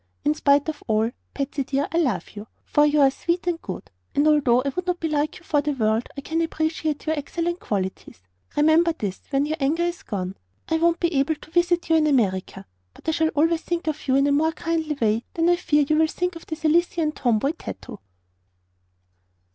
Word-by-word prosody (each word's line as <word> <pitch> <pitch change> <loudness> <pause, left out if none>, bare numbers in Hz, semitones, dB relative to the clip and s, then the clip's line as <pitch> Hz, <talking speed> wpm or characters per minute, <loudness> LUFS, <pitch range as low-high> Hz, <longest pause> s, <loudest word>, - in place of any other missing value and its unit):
"In 150 - +4
spite 280 - +3
of 310 -1 -4
all, 220 +1 +1 0.2
Patsy 275 0 -2
dear, 275 +2 -1
I 335 - +1
love 245 - -1
you; 210 +1 -9 0.2
for 295 0 +4
you 295 0 +3
are 270 -1 +6
sweet 345 +5 -2
and 345 -2 -1
good, 185 - -7 0.2
and 290 +2 +3
although 270 -5 +4
I 280 - 0
would 360 +6 -4
not 355 -1 0
be 325 - -1
like 305 0 -1
you 360 - -17
for 295 -3 +1
the 295 0 -1
world 220 -2 0
I - - -4
can 320 +3 -1
appreciate 315 -2 -2
your 315 0 +1
excellent 340 +4 -3
qualities. 190 - -4 0.3
Remember 320 +3 +4
this 205 - -5
when 275 0 +1
your 310 +1 -2
anger 305 +5 +1
is 345 0 -2
gone. 190 -2 -4 0.3
I 320 - +1
won't 335 +1 +2
be 340 -1 0
able 280 +3 +2
to 300 +1 -16
visit 345 0 +2
you 325 - +6
in 310 -1 +3
America, 195 -7 0 0.3
but - - -17
I - - +3
shall 320 0 +1
always 325 +2 +2
think 345 -1 -3
of 310 -1 -3
you 260 - +3
in 275 +1 +4
a 285 - +2
more 315 +3 +2
kindly 320 -3 -2
way 225 +1 +1
than 330 0 +2
I 350 - +5
fear 295 -4 +2
you 310 - +2
will 320 0 +4
think 360 +2 -2
of 330 - -11
the 315 - -3
Sicilian 325 0 +1
tomboy, 245 -1 +1
TATO." 330 - -9
305 Hz, 220 wpm, -24 LUFS, 270-330 Hz, 0.3 s, are